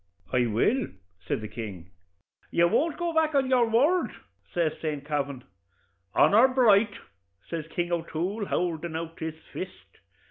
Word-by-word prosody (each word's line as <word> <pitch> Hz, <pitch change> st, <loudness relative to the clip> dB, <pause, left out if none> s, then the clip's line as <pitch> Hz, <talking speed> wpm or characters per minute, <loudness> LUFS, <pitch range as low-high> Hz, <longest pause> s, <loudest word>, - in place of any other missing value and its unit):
'I 125 Hz, -1 st, +3 dB
will,' 210 Hz, -, +2 dB, 0.4 s
says -, -, -1 dB
the 110 Hz, -, -5 dB
king. 95 Hz, -7 st, -7 dB, 0.6 s
'You 170 Hz, 0 st, +4 dB
won't 305 Hz, -, +1 dB
go 345 Hz, -1 st, -1 dB
back 315 Hz, -2 st, +2 dB
o' -, -, +6 dB
your 255 Hz, -3 st, +2 dB
word?' 290 Hz, +11 st, +3 dB, 0.4 s
says 170 Hz, -3 st, +1 dB
St. 150 Hz, -3 st, -3 dB
Kavin. 140 Hz, -3 st, -2 dB, 0.7 s
'Honor 225 Hz, +6 st, +6 dB
bright!' 220 Hz, -5 st, +4 dB, 0.5 s
says 165 Hz, -2 st, -4 dB
King 175 Hz, +1 st, -2 dB
O'Toole, 175 Hz, +5 st, -2 dB
howldin' 170 Hz, -2 st, -1 dB
out 165 Hz, 0 st, -5 dB
his 160 Hz, -1 st, -4 dB, 0.2 s
fist. 185 Hz, 0 st, -8 dB
175 Hz, 140 wpm, -27 LUFS, 155-240 Hz, 0.7 s, o